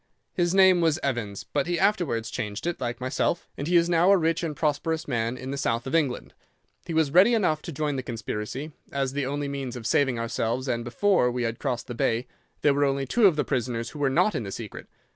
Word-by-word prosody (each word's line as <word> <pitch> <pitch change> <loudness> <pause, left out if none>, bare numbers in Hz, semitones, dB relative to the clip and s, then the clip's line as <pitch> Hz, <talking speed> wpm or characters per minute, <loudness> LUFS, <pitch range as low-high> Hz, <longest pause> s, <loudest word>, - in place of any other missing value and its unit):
His 175 -1 +1
name 190 -2 +6
was 160 -2 +3
Evans, 115 -7 -2
but 145 +1 -2
he 175 -1 0
afterwards 165 - +1
changed 105 -1 -4
it, 175 -5 -2
like 120 -1 -3
myself, 130 +6 -1
and 145 - -4
he 175 - +1
is 170 0 +5
now 175 +1 +3
a 200 - +6
rich 165 0 +1
and 160 -3 -3
prosperous 155 +2 -1
man 120 -2 -1
in 130 +1 -6
the 140 - -3
south 115 -2 -1
of 130 - -5
England. 145 -7 0 0.5
He 165 - -3
was 160 -3 +2
ready 190 +9 +6
enough 155 -8 +1
to 170 - -7
join 150 -1 -2
the - - -1
conspiracy, 120 +4 -5 0.2
as 135 -1 -1
the 140 -2 -1
only 145 +1 -2
means 135 -3 -4
of 120 -2 -7
saving 130 0 +2
ourselves, 115 +2 -2
and 120 -2 -1
before 125 +3 +2
we 125 0 -2
had 115 0 -2
crossed 125 -4 -2
the 125 - -6
Bay 115 +1 0 0.4
there 145 - +5
were 145 +1 +1
only 135 -1 +1
two 215 - +4
of 175 - +3
the 150 - 0
prisoners 120 -3 -2
who 150 - -9
were 140 -2 +2
not 180 +9 +3
in - - -2
the 100 -3 -6
secret. 110 0 -7
140 Hz, 240 wpm, -26 LUFS, 120-165 Hz, 0.5 s, name